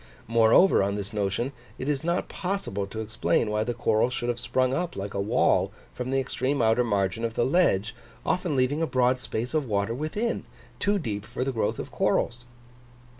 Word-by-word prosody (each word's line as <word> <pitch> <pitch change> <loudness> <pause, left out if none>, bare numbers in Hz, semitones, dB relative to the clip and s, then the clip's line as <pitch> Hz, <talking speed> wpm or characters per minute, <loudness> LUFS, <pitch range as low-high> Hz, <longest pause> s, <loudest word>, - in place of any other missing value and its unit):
Moreover, 115 - +5
on 100 +1 0
this 105 +2 -5
notion, 105 +5 -1 0.3
it 130 - -5
is 145 0 0
not 170 +2 0
possible 180 - -3
to 110 +3 -5
explain 110 0 0
why 105 0 +1
the 120 +1 -3
corals 115 +1 +2
should 120 - -2
have 120 0 -1
sprung 130 +1 +1
up, 175 +3 -2
like 100 +1 -5
a 100 - -1
wall, 110 +5 +2 0.2
from 125 0 -4
the 135 0 +2
extreme 135 +1 -1
outer 115 +2 +3
margin 100 -1 0
of 115 -1 -2
the 120 - +2
ledge, 120 - +2 0.3
often 180 -4 0
leaving 135 +4 +1
a 165 - +1
broad 125 -1 +2
space 125 +1 -4
of 150 -4 0
water 100 +1 0
within, 155 - -2 0.4
too 205 0 +2
deep 105 - -3
for 120 +3 -4
the 135 - -1
growth 110 -4 -1
of - - -6
corals. 120 +1 0
120 Hz, 195 wpm, -27 LUFS, 110-135 Hz, 0.4 s, Moreover